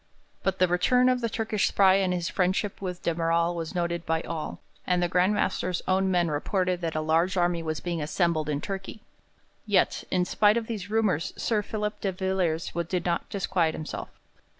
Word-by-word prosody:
But 190 -1 0
the 185 - +4
return 250 +9 +3
of 250 -1 +1
the 230 - 0
Turkish 220 -1 0
spy 190 -1 +5
and 190 -2 +1
his 175 -2 -1
friendship 190 +2 0
with 180 -2 -5
de 170 - +1
Merall 170 +1 +1
was 165 +1 -5
noted 170 -1 -1
by 160 -1 0
all, 165 -2 -5 0.3
and 180 - +2
the - - +2
Grand 180 +4 +2
Master's 180 -3 -1
own 190 +1 +2
men 175 -3 +2
reported 180 +4 0
that 165 -2 -2
a 155 - 0
large 165 +4 +1
army 175 -1 +2
was 155 -1 -3
being 170 -2 -3
assembled 155 0 0
in 145 -1 -1
Turkey. 195 +2 -6 0.6
Yet, 200 -3 +2
in 180 -1 +1
spite 210 +4 +3
of 230 - -1
these 210 -4 -5
rumours, 210 -8 +1
Sir 220 -3 +1
Philip 210 0 -4
de 195 - 0
Villiers 185 -3 -1 0.2
did 180 -1 -2
not 170 -1 -1
disquiet 175 -5 0
himself. 155 - -6
180 Hz, 195 wpm, -27 LUFS, 170-195 Hz, 0.6 s, spy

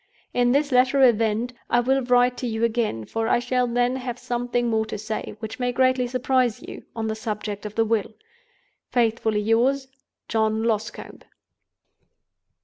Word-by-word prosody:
In 245 0 +3
this 285 +2 +2
latter 260 +2 +4
event, 230 0 +2 0.2
I 240 - +3
will 265 +3 +2
write 245 0 +3
to 250 - -3
you 220 0 -2
again; 225 - 0
for 225 - -2
I - - +3
shall 250 +1 0
then 245 +2 +1
have 250 -2 -5
something 245 -1 -1
more 220 -1 0
to - - -5
say, 215 0 -5
which 220 +2 -7
may 245 0 0
greatly 255 0 +2
surprise 255 -2 +1
you, - - -10
on 225 -1 -3
the 220 - -1
subject 215 -2 -4
of 210 - -11
the 225 - +2
Will. 220 -1 -1 0.7
"Faithfully 225 -3 +1
yours, 250 +5 +2 0.4
"JOHN 220 0 +1
LOSCOMBE." 220 -1 -3
240 Hz, 160 wpm, -24 LUFS, 220-250 Hz, 0.7 s, latter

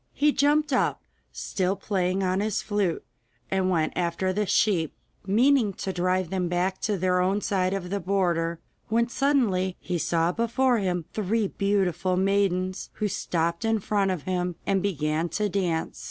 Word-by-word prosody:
He 295 +1 +3
jumped 295 +1 +2
up, - - +1 0.3
still 190 0 -1
playing 190 -2 -1
on 185 +1 +1
his 210 0 -1
flute, 205 -5 -1 0.5
and 190 -1 +1
went 160 -4 +1
after 180 +2 0
the 210 +1 -1
sheep, 175 -8 +2 0.3
meaning 235 +1 +3
to 190 +1 -4
drive 185 0 0
them 185 -2 0
back 180 +2 -1
to 210 -2 0
their 180 0 +1
own 190 +3 +1
side 185 -3 0
of 180 -2 -5
the 200 - 0
border, 170 -3 0 0.3
when 235 +2 +2
suddenly 230 -10 +1
he 180 -2 -3
saw 165 +1 +1
before 235 +3 +1
him 180 -4 -1
three 215 0 0
beautiful 190 -2 0
maidens 190 -1 0
who 215 - -1
stopped 170 -3 -1
in 225 0 +2
front 200 -1 0
of 180 -6 -2
him, 180 -1 -2
and 195 -1 +1
began 160 -3 -1
to 210 +6 -1
dance. 175 -4 -1
190 Hz, 165 wpm, -26 LUFS, 180-210 Hz, 0.5 s, He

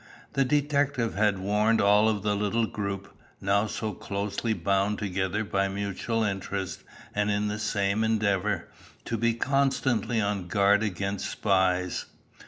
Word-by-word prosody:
The 135 - +3
detective 145 -3 +1
had 105 0 +2
warned 105 +4 +2
all 105 +1 +5
of 105 -3 -1
the 105 -1 +1
little 105 +3 +1
group, 100 -2 -5 0.2
now 100 +2 +2
so 105 0 -3
closely 100 +4 -3
bound 100 0 +1
together 100 +1 -1
by 100 -2 0
mutual 100 +3 -2
interest 95 -2 -3 0.3
and 105 0 +1
in 105 0 0
the 105 +1 -3
same 105 0 0
endeavour, 105 -2 +1 0.4
to 115 - -2
be 115 +1 +1
constantly 130 -3 +1
on 100 -3 -1
guard 100 +2 +3
against 100 -1 -2
spies. 90 -3 +1
105 Hz, 140 wpm, -27 LUFS, 100-110 Hz, 0.4 s, all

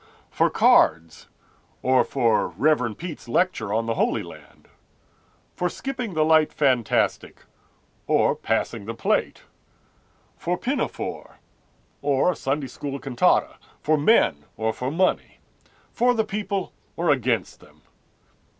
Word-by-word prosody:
For - - +2
cards, 80 0 +3 0.6
or 130 0 +4
for 115 -5 +1
Rev. 120 - 0
Peet's 170 -6 -8
lecture 120 - 0
on 115 +2 0
the 115 - -1
holy - - 0
land; - - -15 0.9
For 180 - -1
skipping 250 -4 -5
the 155 0 +3
light 160 -1 +4
fantastic, 130 -6 0 0.6
or - - +3
passing 100 - -2
the 115 +2 -5
plate; - - -1 0.9
For 175 +1 -2
Pinafore, 265 +9 -4 0.6
or 140 +4 +2
a - - -6
Sunday 140 +1 -2
school 140 +2 -6
cantata; 135 -3 +1 0.2
For 155 - +3
men, 145 - +3
or 110 +1 -1
for 125 +3 -4
money; 180 +5 0 0.6
For 245 +1 +2
the 220 -1 +1
people 200 -2 -3 0.2
or 170 -2 +1
against 130 -5 -1
them. - - -21
145 Hz, 125 wpm, -24 LUFS, 115-180 Hz, 0.9 s, or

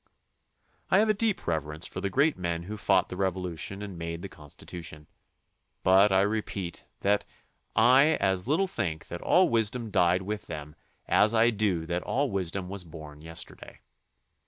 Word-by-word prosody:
I - - +5
have 215 +2 +4
a - - +5
deep 215 0 0
reverence 80 0 -2
for - - -6
the 100 - -1
great 140 +9 +3
men 85 -2 -3
who 105 +5 -6
fought 100 -3 +2
the - - -5
Revolution 95 0 -3
and 95 -4 -7
made 85 0 -5
the 100 - -5
Constitution, 75 +1 -10 0.8
but 95 +2 +6
I 95 0 +5
re 105 +2 +1
peat 95 -4 -6 0.2
that 100 +1 +2 0.5
I 135 +5 +6
as 95 0 0
little 160 +8 +2
think 90 - -4
that 85 - -6
all 185 0 +4
wisdom 115 0 0
died 90 +1 +3
with 105 +2 -4
them 75 -2 -7 0.3
as 110 +2 +4
I 115 +2 +5
do 100 -7 0
that 85 +1 -2
all 140 +5 -1
wisdom 95 -1 -2
was 100 0 -5
born 75 -3 -11
yesterday. 80 +1 -7
95 Hz, 170 wpm, -28 LUFS, 85-110 Hz, 0.8 s, but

